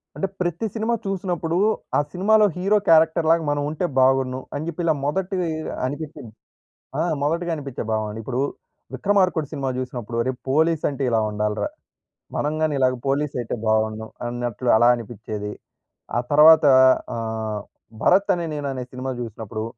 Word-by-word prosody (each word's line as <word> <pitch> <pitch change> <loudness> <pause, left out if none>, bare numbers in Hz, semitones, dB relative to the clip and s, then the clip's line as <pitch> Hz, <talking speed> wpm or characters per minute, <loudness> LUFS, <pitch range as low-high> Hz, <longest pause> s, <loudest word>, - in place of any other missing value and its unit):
అంటే, 195 - -1
ప్రతి 175 +4 -1
సినిమా 225 +1 -1
చూసినప్పుడూ, 175 -4 -2 0.4
ఆ - - +4
సినిమాలో 210 +4 +4
హీరో 195 +4 +2
క్యారెక్టర్‌ 160 0 +5
లాగా 165 0 +3
మనవుంటే 145 +3 -1
బావున్ను, 130 0 +3
అని 145 - -3
జెప్పి 170 +1 -4
ఇలా 160 - +4
మొదటీ 185 +6 -1 0.5
అనిపిచ్చింది. 145 -3 -6 0.7
ఆ! - - +1 0.2
మొదటిగా 170 +4 0
అనిపిచ్చే 140 -4 -5
భావన. 110 -1 -1
ఇప్పుడూ 125 +3 -2 0.5
'విక్రమార్కుడు' 180 -1 +1
సినిమా 135 -1 -2
జూసినప్పుడు, 125 -3 -5
అరె, 130 - -1 0.2
పోలీసంటే 150 -1 +1
ఇలా 115 -1 +3
ఉండాలిరా. 105 - -1 0.7
మనం 150 +1 0
గానీ 155 -2 +1
ఇలాగా 130 -1 +2
పోలీసయితే 135 -4 -1
బావుండును 110 0 +1 0.2
అన్నట్లు 120 0 -3
అలా 120 +2 +5
అనిపిచ్చేది. 110 -3 -6 0.7
ఆ - - +3
తర్వాతా 150 0 +7 0.4
ఆహ్, 110 -2 -3 0.4
'భరత్ 195 +2 +4
అనే 170 -1 -3
నేను' 145 -1 -3
అనే 130 -1 -4
సినిమా 130 +1 -4
జూసినప్పుడు, 110 -1 -6
140 Hz, 135 wpm, -23 LUFS, 120-165 Hz, 0.7 s, తర్వాతా